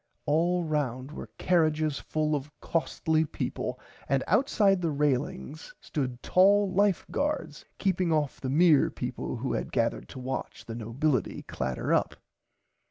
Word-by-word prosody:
All 170 +4 +2
round 140 -4 -2
were - - -8
carrages 155 -4 +2
full 155 0 -1
of 145 0 -4
costly 160 -1 0
peaple 155 - -4 0.3
and 135 0 +2
outside 205 -7 +3
the 170 - +1
railings 145 +1 -2
stood 125 -4 -4
tall 195 +1 +4
Life 200 -1 +2
Guards 285 - -2
keeping 185 -3 +1
off 150 -3 0
the 130 - -2
mere 155 0 +5
peaple - - -4
who - - -2
had - - -3
gathered - - 0
to - - -10
watch 130 +1 -5
the 115 - -6
nobility 120 - -1
clatter 65 0 -2
up. - - +1
155 Hz, 140 wpm, -28 LUFS, 135-180 Hz, 0.3 s, mere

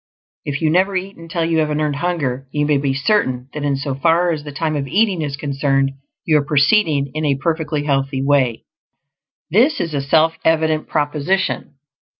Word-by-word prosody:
If 140 +2 -3
you 155 - +3
never 190 +3 +2
eat 190 +2 -3
until 165 0 -3
you 165 -1 +1
have 155 -1 +1
an 150 0 -1
Earned 150 -2 -1
Hunger, 145 -6 -2
you 150 0 0
may 145 -1 +2
be 140 -1 0
certain 135 -5 0
that 150 - -5
in 140 -1 +1
so 135 0 -3
far 170 +5 +2
as 155 -3 -3
the 145 - -7
time 155 +1 -2
of 140 -1 -2
eating 195 +1 +1
is 140 -2 -3
concerned, 135 -1 0 0.3
you 155 -2 +4
are - - -2
proceeding 145 -1 +2
in 155 +1 -3
a 145 -2 +2
perfectly 155 0 -1
healthy 135 -2 -1
way. 135 -5 +1 0.9
This 240 - +3
is 165 -2 -3
a 140 - 0
self 160 +4 +2
evident 160 -1 +1
proposition. 150 +6 -1
150 Hz, 190 wpm, -19 LUFS, 140-165 Hz, 0.9 s, you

